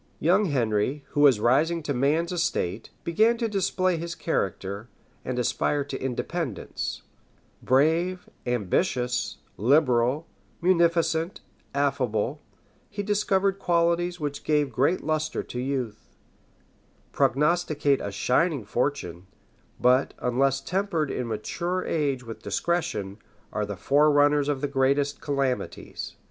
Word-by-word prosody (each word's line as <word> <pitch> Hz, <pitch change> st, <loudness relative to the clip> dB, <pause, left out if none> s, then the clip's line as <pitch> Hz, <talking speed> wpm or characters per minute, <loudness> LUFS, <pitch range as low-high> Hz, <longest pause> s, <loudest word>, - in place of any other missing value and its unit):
Young 185 Hz, +6 st, +3 dB
Henry, 130 Hz, -, 0 dB
who -, -, -3 dB
was 135 Hz, -7 st, +6 dB
rising 150 Hz, +9 st, +2 dB
to 145 Hz, -, -1 dB
man's 150 Hz, +7 st, +1 dB
estate, 115 Hz, -, -1 dB
began 220 Hz, +8 st, +3 dB
to 230 Hz, -1 st, 0 dB
display 185 Hz, -3 st, 0 dB
his 170 Hz, +1 st, -5 dB
character, 100 Hz, -, -2 dB, 0.3 s
and 125 Hz, -1 st, -3 dB
aspire 140 Hz, +4 st, 0 dB
to 140 Hz, -1 st, -6 dB
independence: 130 Hz, -, -3 dB, 0.6 s
brave, 165 Hz, +7 st, +2 dB, 0.2 s
ambitious, 125 Hz, -, 0 dB, 0.2 s
liberal, 130 Hz, -, +3 dB, 0.3 s
munificent, 170 Hz, -1 st, +2 dB, 0.3 s
affable: 135 Hz, -2 st, 0 dB, 0.5 s
he 205 Hz, 0 st, -4 dB
discovered 200 Hz, -1 st, +1 dB
qualities 175 Hz, 0 st, +1 dB
which 145 Hz, -2 st, -4 dB
give 150 Hz, -3 st, +1 dB
great 135 Hz, +10 st, +1 dB
lustre 155 Hz, 0 st, -1 dB
to 125 Hz, -, -6 dB
youth; 125 Hz, -4 st, -3 dB, 1.0 s
prognosticate 145 Hz, +1 st, +2 dB
a 100 Hz, -, -4 dB
shining 135 Hz, -, +1 dB
fortune; 100 Hz, -, -2 dB, 0.5 s
but, 125 Hz, +2 st, +3 dB
unless 135 Hz, +2 st, +1 dB
tempered 180 Hz, -2 st, -1 dB
in 125 Hz, -, -3 dB
mature 170 Hz, -, -2 dB
age 140 Hz, -5 st, 0 dB
with 115 Hz, -1 st, -8 dB
discretion, 110 Hz, -, -2 dB, 0.3 s
are 105 Hz, -1 st, -1 dB
the 100 Hz, -2 st, -5 dB
forerunners 145 Hz, -, +4 dB
of 140 Hz, -2 st, -1 dB
the 145 Hz, -, 0 dB
greatest 140 Hz, +1 st, +1 dB
calamities. 140 Hz, -3 st, -3 dB
145 Hz, 115 wpm, -26 LUFS, 125-170 Hz, 1.0 s, was